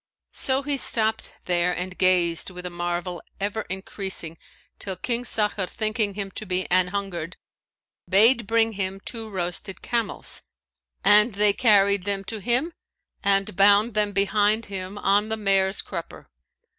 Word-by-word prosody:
So 265 +1 +2
he 285 0 -1
stopped 220 -3 +2
there 175 0 +1
and 180 +1 -4
gazed 180 -2 +2
with 180 -1 -9
a 180 - -5
marvel 175 0 -4 0.2
ever 205 +2 -3
increasing 190 -3 -3 0.4
till 190 -2 -5
King 235 +6 -2
Sakhr 210 -4 +1
thinking 215 -1 -2
him 200 -1 -4
to 215 - -7
be 185 0 -1
anhungered, 180 -2 -1 0.7
bade 225 +3 +4
bring 225 0 +2
him 190 -1 -3
two 225 0 -6
roasted 185 0 -4
camels; 235 -3 -1 0.6
and 210 +3 +5
they 205 +1 +3
carried 200 -4 +3
them 200 -1 -2
to 220 +2 -6
him 245 - 0 0.5
and 195 0 +1
bound 205 +4 +4
them 210 -1 +1
behind 205 +2 +1
him 190 +1 -5
on 205 +2 +1
the 220 - -2
mare's 195 -2 +1
crupper. - - -8
200 Hz, 145 wpm, -24 LUFS, 185-215 Hz, 0.7 s, and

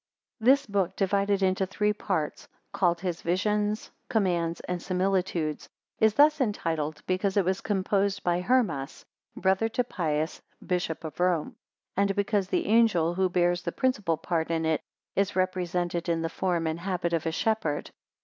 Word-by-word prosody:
[This 270 +5 +4
book, 195 -3 0
divided 200 0 +1
into 190 0 +2
three 210 +2 +1
parts, 185 -7 -3 0.3
called 175 -2 +1
his 180 -3 -3
VISIONS, 210 +4 0 0.2
COMMANDS, 175 -6 +1
and 180 -1 -4
SIMILITUDES, 180 -4 -1 0.3
is 220 -1 +4
thus 300 0 +5
entitled, 160 - -1
because 190 +2 0
it 195 - +3
was 190 +1 0
composed 200 0 0
by 175 0 +1
Hermas, 180 - 0 0.3
brother 190 +4 +2
to 250 +2 0
Pius, 160 -7 -2 0.2
bishop 175 -3 -2
of 155 0 -7
Rome; 175 -3 +1 0.4
and 200 0 +2
because 200 -1 +1
the - - 0
Angel, 205 -7 +3
who 185 +1 +1
bears 175 0 +2
the 170 - -3
principal 210 -11 0
part 165 0 -1
in 165 -1 0
it, 160 -1 +1 0.3
is 200 0 +1
represented 180 -2 -1
in 165 -1 0
the 165 - -1
form 175 -1 -1
and 160 +1 -2
habit 175 -2 -2
of 165 -1 0
a - - +1
shepherd. 215 -4 -1
185 Hz, 160 wpm, -27 LUFS, 170-200 Hz, 0.4 s, thus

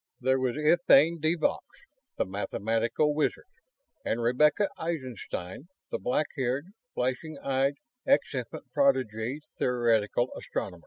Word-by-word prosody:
There 130 +1 +2
was 130 0 -1
Etienne 160 0 +5
de 155 +2 +2
Vaux, 160 - 0 0.5
the - - +1
mathematical 115 +8 0
wizard; 150 0 -1 0.6
and 115 - -1
Rebecca 150 - +3
Eisenstein, 130 - -5 0.2
the - - -2
black 125 +10 +1
haired, 135 +4 -1 0.3
flashing 130 +5 -2
eyed 135 +1 0 0.3
ex 280 - +3
infant - - -5
prodigy 130 - +1 0.2
theoretical 120 -1 +1
astronomer. 90 - -5
130 Hz, 115 wpm, -28 LUFS, 120-155 Hz, 0.6 s, Etienne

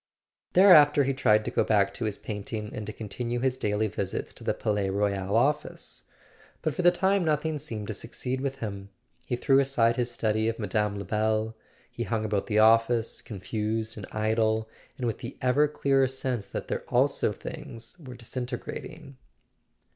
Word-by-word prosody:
Thereafter 150 -7 +7
he 135 +1 0
tried 110 -4 +3
to - - -2
go - - +2
back 100 -2 +2
to 115 - -3
his 105 -2 -2
painting 105 0 -5
and 105 -1 -5
to - - -3
continue 115 +3 -4
his 130 0 +1
daily 105 -3 0
visits 100 - -3
to - - -12
the - - 0
Palais 105 -2 0
Royal 100 0 0
office. 145 +5 -1 0.6
But 155 - 0
for - - -2
the 175 - +7
time 190 +2 +2
nothing 155 -1 0
seemed 110 -5 -5
to 110 - -4
succeed 125 +4 -3
with 135 -1 -2
him. 100 -5 -6 0.4
He - - 0
threw 135 +2 +3
aside 120 -4 +2
his 125 -1 0
study 110 -2 0
of 115 - -3
Mme. 105 0 0
Lebel—he 110 +2 -3
hung 110 -1 -1
about 105 -2 -1
the 105 - 0
office, 115 +1 +4
confused 110 +2 -3
and 105 -3 -7
idle, 110 0 +1 0.3
and 125 - -3
with 115 - -2
the 125 0 -7
ever 140 +4 +3
clearer 135 -2 +2
sense 130 -4 -3
that - - -5
there - - -2
also - - +2
things 115 +4 -8
were 130 -6 -10
disintegrat¬ 120 +1 -5
ing. 145 -4 -13
115 Hz, 175 wpm, -27 LUFS, 105-130 Hz, 0.6 s, Thereafter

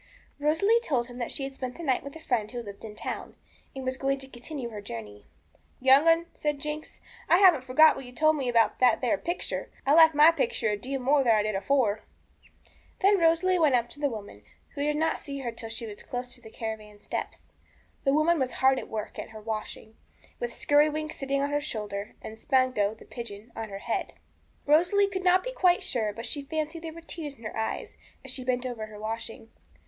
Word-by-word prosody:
Rosalie 325 +10 +3
told 255 - 0
him 245 +1 -9
that 240 - -2
she 275 - -3
had 270 0 -4
spent 255 -2 -5
the 340 - -7
night 265 -5 +1
with 280 +2 -9
a - - -8
friend 230 -8 -1
who 240 0 -5
lived 200 -2 -10
in 215 -2 -8
the - - -11
town, - - -5 0.4
and 265 -1 -6
was 260 0 -2
going 275 0 0
to 270 0 -9
continue 255 0 -7
her 210 -2 -7
journey. 105 - -8 0.5
'Young 265 +4 +6
'un,' 330 +1 +5
said 295 -1 -1
Jinx, 300 +2 -6 0.3
'I 345 - +7
haven't 360 -9 +6
forgot 305 +5 +6
what - - -7
you 245 - -10
told 310 +5 +3
me 270 -4 -1
about 230 -3 +3
that 245 -3 +5
there 255 +4 +2
picture. 345 +1 -3 0.2
I 275 - +4
like 320 -1 +7
my 300 +3 +8
picture 400 - 0
a 210 - +1
deal 265 +6 -4
more 275 +2 +3
than 230 -3 +4
I 210 - +2
did 215 0 -1
afore.' 215 +1 +1 1.0
Then 400 0 +5
Rosalie 340 +2 +3
went 300 -5 +4
up 240 -1 +1
to - - -7
the 290 -1 +1
woman, 205 - -8 0.3
who 285 - -6
did 295 +1 +1
not 320 +1 +1
see 280 -1 -6
her 240 -3 -3
till 225 0 -7
she 230 +1 -5
was 210 -2 -8
close 245 0 -5
to 245 - -6
the 220 - -12
caravan 220 -2 -6
steps. - - -5 0.6
The 275 - +3
woman 320 +2 +3
was 260 -2 -1
hard 265 0 +3
at - - -9
work 215 -1 -5
at - - -6
her 220 0 -10
washing, 220 0 -6 0.4
with 485 - -3
Skirrywinks 305 +1 +2
sitting 275 0 0
on 285 - -1
her 290 0 +1
shoulder, 210 -8 -5
and 220 - -8
Spanco, 250 -5 +1
the - - -15
pigeon, 230 -1 -8
on 225 -1 -5
her 195 - -6
head. 225 +3 -3 0.5
Rosalie 355 +7 +4
could 375 -1 -3
not 370 0 +4
be - - -4
quite 365 -4 +3
sure, 230 - 0
but 230 +3 -7
she 290 - -3
fancied 310 +3 -3
there 325 -1 -6
were 335 +1 -11
tears 320 -3 -5
in 230 - -18
her 215 - -6
eyes 220 0 -3 0.3
as - - -3
she 255 - -4
bent 250 0 0
over 230 -4 -4
her 215 -1 -11
washing. 225 +1 -5
265 Hz, 225 wpm, -28 LUFS, 225-310 Hz, 1.0 s, my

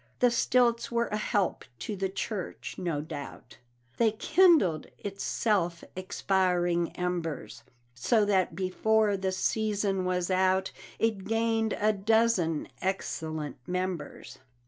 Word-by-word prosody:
The 245 -1 +4
stilts 240 0 +2
were 235 0 0
a - - -2
help 205 -3 0
to 210 - -4
the 190 0 -2
church, 195 0 -5
no 170 -5 -1
doubt, 145 -5 -9 0.4
They 225 -2 +3
kindled 285 - +4
its 195 -1 -6
self 175 -6 0
expiring 180 -2 +1
embers, 175 -5 -3 0.3
So 205 - +2
that 190 -5 +1
before 205 +3 +2
the 190 -1 -1
season 200 0 0
was 180 0 -1
out 185 0 +2 0.3
It 220 -4 0
gained 225 0 +1
a 215 +1 +3
dozen 200 -6 +1
excellent 160 -6 -3
members. 180 -1 -4
190 Hz, 120 wpm, -29 LUFS, 175-220 Hz, 0.4 s, The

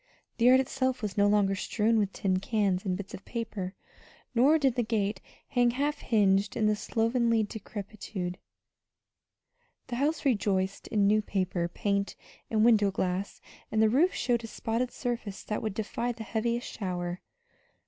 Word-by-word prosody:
The 230 - +3
yard 255 +1 +7
itself 260 -1 -1
was 205 -3 -2
no 205 0 +4
longer 205 -1 +3
strewn 220 +3 +1
with 200 -2 0
tin 185 -2 0
cans 195 -2 0
and 185 -2 0
bits 195 -1 -8
of 195 - -8
paper, 215 -5 -4 0.6
nor 270 +7 +5
did 270 -5 +2
the 245 - 0
gate 210 -3 -1 0.3
hang 245 -2 +3
half 285 +4 -1
hinged 205 -2 +2
in 215 -1 +3
slovenly 230 +1 +1
decrepitude. 200 -3 -6 1.5
The 240 - -3
house 295 +3 0
rejoiced 195 -6 0
in 205 -2 +2
new 215 +2 +4
paper, 185 -4 -1
paint, 200 +3 -1 0.3
and 215 0 +3
window 215 -4 +5
glass, 190 0 -2 0.3
and 220 - +1
the 220 0 +5
roof 305 - +4
showed 240 -2 0
a - - -5
spotted 230 +3 -2
surface 235 -6 -4
that 210 - -3
would 215 -3 -3
defy 230 +3 -2
the 230 -1 -7
heaviest 235 +3 -1
shower. 180 -3 -4
215 Hz, 160 wpm, -29 LUFS, 195-235 Hz, 1.5 s, yard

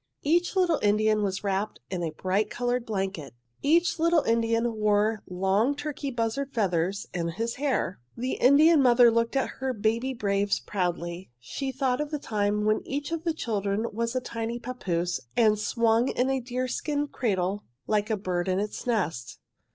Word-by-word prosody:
"Each 345 +6 +2
little 355 -4 +3
Indian 215 +1 +3
was 195 -1 -2
wrapped 200 +1 -2
in 185 -2 -2
a 165 - -1
bright 190 +6 -1
coloured 245 0 -1
blanket. 190 - -3 0.3
Each 335 +3 +2
little 335 -1 +3
Indian 230 0 +1
wore 210 0 +2
long 195 +9 +1
turkey 290 -1 -4
buzzard 245 +3 -2
feathers 195 -2 0
in 170 -1 -1
his 230 +8 -3
hair. 265 - -1 0.2
"The 255 +2 -2
Indian 295 +4 +5
mother 245 -2 +6
looked 230 +2 0
at 270 - +1
her 265 0 -1
baby 230 +4 0
braves 200 -2 0
proudly. 175 -1 -3
She 265 - -4
thought 260 0 0
of 300 - -3
the 300 - -2
time 210 -5 -1
when 215 0 +2
each 285 +3 -4
of 330 0 -3
the 330 - +1
children 210 -5 -1
was 230 +3 -2
a 255 - +1
tiny 230 -1 -4
papoose 180 -9 -2 0.2
and 215 -3 +4
swung 230 +2 +2
in 260 +1 0
a 270 - +1
deerskin 255 +4 -2
cradle 200 -6 -1 0.2
like 210 0 0
a 220 - +1
bird 180 -2 -2
in 185 0 +1
its 210 +4 -4
nest. 165 - -1
225 Hz, 170 wpm, -27 LUFS, 200-260 Hz, 0.3 s, mother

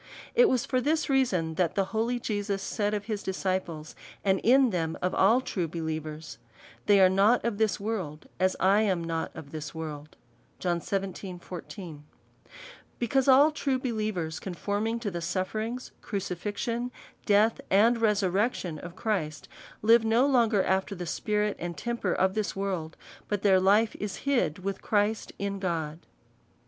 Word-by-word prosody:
It 485 -2 +6
was 250 -2 +1
for 255 -2 0
this 310 +2 +1
reason, 190 -12 +1
that 170 -3 +1
the 195 - +2
holy 235 +3 0
Jesus 205 -3 -2
said 210 0 -1
of 205 -1 -4
his 215 -2 -3
disciples, 185 -4 -3 0.3
and 190 -1 +3
in 255 +1 +5
them 165 -3 -1
of 180 - -1
all 225 +7 +4
true 180 -9 -2
believers, 155 -1 -5 0.2
" - - -22
They 205 -1 +6
are 190 - +8
not 200 +7 +3
of 225 -3 -1
this 220 -1 +1
world, 190 -8 -4
as 185 0 +2
I 195 +3 +4
am 190 -6 +1
not 165 -1 -2
of 155 -3 -9
this 155 0 -6
world." 155 -2 -7 0.4
Be 185 +1 -2 1.7
cause 265 +3 +2
all 280 +4 +7
true 280 -3 0
believers 215 -10 -2
conforming 205 +5 -2
to 210 -4 -2
the 170 -1 -4
sufterings, 215 +8 -3
crucifixion, 210 +5 -3 0.4
death, 210 +2 +4
and 225 +4 +4
resurrection 200 -4 +1
of 170 +2 -9
Christ, 180 -9 -2 0.4
live 225 +1 +6
no 225 +4 +3
longer 235 -7 +3
after 190 +2 0
the 180 -1 -5
spirit 210 +4 -1
and 175 -2 -5
temper 235 +1 -2
of 190 +1 +2
this 215 -1 -2
world, 185 -5 -3 0.3
but 205 -1 -2
their 190 -2 +5
life 205 +4 +3
is 205 -2 -3
hid 240 - +1
with 195 0 -3
Christ 210 +1 0
in 200 0 -3
God. 165 -4 -3
200 Hz, 155 wpm, -28 LUFS, 175-225 Hz, 1.7 s, are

